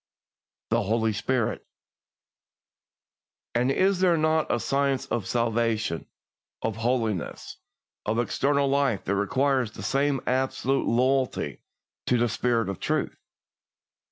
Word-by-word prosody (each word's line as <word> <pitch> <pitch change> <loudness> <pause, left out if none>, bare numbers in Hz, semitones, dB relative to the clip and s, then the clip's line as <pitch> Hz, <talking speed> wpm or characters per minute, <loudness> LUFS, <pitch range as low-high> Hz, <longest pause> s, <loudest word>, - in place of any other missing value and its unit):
THE - - +3
HOLY 110 +1 +1
SPIRIT. 120 +2 -1 1.9
And 125 +3 +2
is 190 +5 +2
there 180 -3 +4
not 155 0 +1
a 120 - +1
science 140 +1 0
of 110 -6 -2
salvation, 115 -6 0 0.6
of 110 -1 -2
holiness, 115 -5 -2 0.5
of 110 +2 +1
eternal 140 +4 +1
life, 135 -6 +1
that 100 - 0
requires 130 +3 +1
the - - -8
same 140 0 +1
absolute 130 +1 0
loyalty 130 +2 +1 0.5
to 125 - +3
"the 120 0 +2
Spirit 115 0 0
of 95 -2 -4
Truth"? - - -1
125 Hz, 115 wpm, -26 LUFS, 115-135 Hz, 1.9 s, there